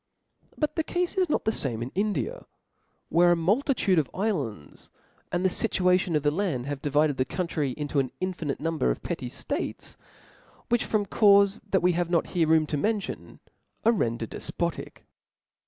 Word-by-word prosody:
But 300 Hz, +1 st, -1 dB
the 320 Hz, -, +2 dB
cafe 360 Hz, +3 st, -1 dB
is 360 Hz, -, +1 dB
not -, -, 0 dB
the 220 Hz, -, +3 dB
fame 120 Hz, -, -2 dB
in 125 Hz, -, -6 dB
India, 195 Hz, -, -2 dB, 0.6 s
where 175 Hz, +1 st, +5 dB
a -, -, +2 dB
multitude 195 Hz, -, +2 dB
of 145 Hz, -, -2 dB
iflands, 145 Hz, -, -3 dB, 0.4 s
and 180 Hz, +1 st, 0 dB
the -, -, +7 dB
fituation 180 Hz, -1 st, +1 dB
of 150 Hz, -, +1 dB
the 145 Hz, -, +3 dB
land, 155 Hz, -8 st, -1 dB
have 140 Hz, -1 st, -4 dB
divided 145 Hz, 0 st, +2 dB
the 130 Hz, -, +2 dB
country 150 Hz, -3 st, -2 dB
into 145 Hz, -1 st, -1 dB
an 130 Hz, -2 st, -1 dB
infinite 175 Hz, -6 st, -3 dB
number 165 Hz, -, 0 dB
of -, -, -2 dB
petty -, -, -4 dB
ftates, -, -, -5 dB, 0.7 s
which 240 Hz, -1 st, +2 dB
from 210 Hz, -2 st, 0 dB
caufes 200 Hz, 0 st, +4 dB
that 190 Hz, -2 st, +2 dB
we 180 Hz, -, +5 dB
have 175 Hz, 0 st, -1 dB
not 170 Hz, -2 st, +2 dB
here 170 Hz, -3 st, +2 dB
room 160 Hz, -1 st, +4 dB
to 150 Hz, -, -2 dB
mention, 210 Hz, +6 st, -3 dB, 0.4 s
are 230 Hz, -, +7 dB
rendered 115 Hz, -, -1 dB
defpotic. -, -, -4 dB
175 Hz, 170 wpm, -27 LUFS, 145-200 Hz, 0.7 s, the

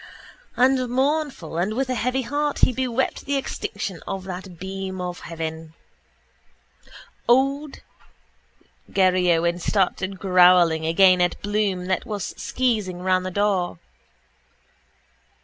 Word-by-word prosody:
And 255 Hz, 0 st, +3 dB
mournful 265 Hz, -, -1 dB
and 200 Hz, +5 st, -1 dB
with 265 Hz, +2 st, 0 dB
a 255 Hz, -, -1 dB
heavy 250 Hz, +2 st, -1 dB
heart 290 Hz, +4 st, -1 dB
he 255 Hz, -, -1 dB
bewept 255 Hz, 0 st, -1 dB
the 280 Hz, -, -1 dB
extinction 200 Hz, -8 st, -4 dB
of 190 Hz, -1 st, -4 dB
that 185 Hz, -1 st, -8 dB
beam 190 Hz, +1 st, -5 dB
of 180 Hz, -1 st, -4 dB
heaven. 160 Hz, -1 st, -6 dB, 1.5 s
Old 275 Hz, +4 st, +1 dB, 1.1 s
Garryowen 180 Hz, -2 st, +2 dB
started 190 Hz, +1 st, 0 dB
growling 180 Hz, -4 st, +4 dB
again 185 Hz, +2 st, +5 dB
at 175 Hz, -, +1 dB
Bloom 205 Hz, -3 st, -1 dB
that 185 Hz, 0 st, -2 dB
was 205 Hz, -3 st, -4 dB
skeezing 210 Hz, -8 st, -1 dB
round 185 Hz, 0 st, +1 dB
the -, -, -2 dB
door. 190 Hz, -3 st, 0 dB
190 Hz, 115 wpm, -23 LUFS, 180-250 Hz, 1.5 s, again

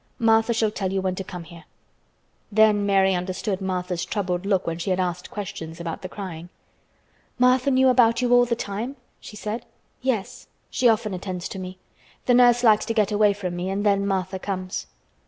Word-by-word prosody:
Martha 225 Hz, 0 st, +3 dB
shall 225 Hz, -2 st, +1 dB
tell 190 Hz, -3 st, -3 dB
you 195 Hz, -, 0 dB
when 190 Hz, -1 st, -1 dB
to 190 Hz, -, -5 dB
come 180 Hz, -2 st, -8 dB
here." 170 Hz, -1 st, -13 dB, 0.9 s
Then 210 Hz, -1 st, +4 dB
Mary 195 Hz, -1 st, +4 dB
understood 185 Hz, +2 st, -2 dB
Martha's 180 Hz, -2 st, -2 dB
troubled 185 Hz, -3 st, -2 dB
look 195 Hz, -3 st, +1 dB
when 165 Hz, 0 st, -3 dB
she 175 Hz, -, -3 dB
had 185 Hz, 0 st, +1 dB
asked 180 Hz, -1 st, -2 dB
questions 165 Hz, -5 st, -7 dB
about 170 Hz, -1 st, -5 dB
the 185 Hz, -, -6 dB
crying. 180 Hz, -4 st, -7 dB, 0.9 s
"Martha 255 Hz, +2 st, +4 dB
knew 260 Hz, 0 st, +4 dB
about 235 Hz, -2 st, +4 dB
you 245 Hz, -1 st, +2 dB
all 245 Hz, 0 st, +6 dB
the 235 Hz, -1 st, 0 dB
time?" 225 Hz, +5 st, -4 dB, 0.2 s
she -, -, -11 dB
said. 215 Hz, +2 st, -4 dB, 0.4 s
"Yes; 245 Hz, -2 st, -2 dB, 0.2 s
she 245 Hz, -, +3 dB
often 215 Hz, -2 st, +1 dB
attends 185 Hz, -1 st, -4 dB
to 190 Hz, -, -6 dB
me. 185 Hz, 0 st, -7 dB, 0.5 s
The 250 Hz, -, +4 dB
nurse 245 Hz, 0 st, +5 dB
likes 215 Hz, -3 st, +5 dB
to 225 Hz, -, -2 dB
get 210 Hz, -1 st, +2 dB
away 210 Hz, -1 st, +4 dB
from 185 Hz, -3 st, -4 dB
me 180 Hz, +2 st, -3 dB
and 200 Hz, +2 st, -2 dB
then 200 Hz, -1 st, +2 dB
Martha 190 Hz, -1 st, -2 dB
comes." 185 Hz, -1 st, -4 dB
200 Hz, 195 wpm, -24 LUFS, 185-225 Hz, 0.9 s, all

